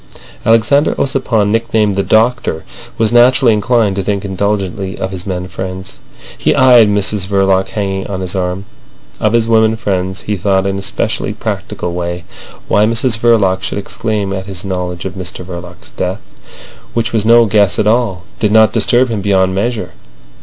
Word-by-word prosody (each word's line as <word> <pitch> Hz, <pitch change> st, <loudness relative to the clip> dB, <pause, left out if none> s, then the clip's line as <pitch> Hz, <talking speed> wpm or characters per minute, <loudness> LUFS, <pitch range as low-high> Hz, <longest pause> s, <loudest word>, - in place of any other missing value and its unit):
Alexander 115 Hz, +6 st, +3 dB
Ossipon, 120 Hz, -6 st, 0 dB
nicknamed 110 Hz, -2 st, +1 dB
the 100 Hz, -, +1 dB
Doctor, 110 Hz, -6 st, +1 dB, 0.3 s
was 110 Hz, -1 st, +1 dB
naturally 120 Hz, 0 st, +5 dB
inclined 105 Hz, -1 st, +1 dB
to 100 Hz, -, -1 dB
think 100 Hz, +1 st, -2 dB
indulgently 95 Hz, 0 st, -2 dB
of 95 Hz, -, -4 dB
his 95 Hz, 0 st, -6 dB
men 90 Hz, -1 st, -3 dB
friends. 95 Hz, +1 st, -7 dB, 0.4 s
He -, -, +1 dB
eyed 120 Hz, -4 st, +6 dB
Mrs 100 Hz, -1 st, -1 dB
Verloc 95 Hz, -1 st, +2 dB
hanging 95 Hz, -2 st, -3 dB
on 95 Hz, -2 st, -4 dB
his 90 Hz, -1 st, -4 dB
arm. 95 Hz, +1 st, -3 dB, 0.5 s
Of 110 Hz, +1 st, +1 dB
his 115 Hz, -1 st, +2 dB
women 110 Hz, -1 st, +3 dB
friends 95 Hz, -4 st, -2 dB
he 105 Hz, -1 st, -3 dB
thought 95 Hz, +1 st, +1 dB
in 100 Hz, 0 st, -1 dB
a -, -, -6 dB
specially -, -, -2 dB
practical 85 Hz, -, -4 dB
way. 85 Hz, 0 st, -4 dB, 0.4 s
Why 105 Hz, +1 st, +3 dB
Mrs 115 Hz, +1 st, +1 dB
Verloc 105 Hz, -6 st, +2 dB
should 100 Hz, -, -3 dB
exclaim 105 Hz, -1 st, -3 dB
at 95 Hz, 0 st, -5 dB
his 95 Hz, -1 st, -6 dB
knowledge 90 Hz, -2 st, -4 dB
of 95 Hz, -, -4 dB
Mr 90 Hz, -1 st, -7 dB
Verloc's 90 Hz, -1 st, -10 dB
death, -, -, -3 dB, 0.7 s
which 115 Hz, 0 st, -1 dB
was 110 Hz, -2 st, +1 dB
no 115 Hz, +1 st, +6 dB
guess 100 Hz, -4 st, +2 dB
at -, -, +1 dB
all, 105 Hz, -5 st, +1 dB, 0.2 s
did 105 Hz, -2 st, +1 dB
not 110 Hz, 0 st, +5 dB
disturb 120 Hz, +3 st, +2 dB
him 110 Hz, -3 st, -2 dB
beyond 95 Hz, -2 st, +2 dB
measure. 105 Hz, -2 st, -2 dB
100 Hz, 170 wpm, -14 LUFS, 95-115 Hz, 0.7 s, eyed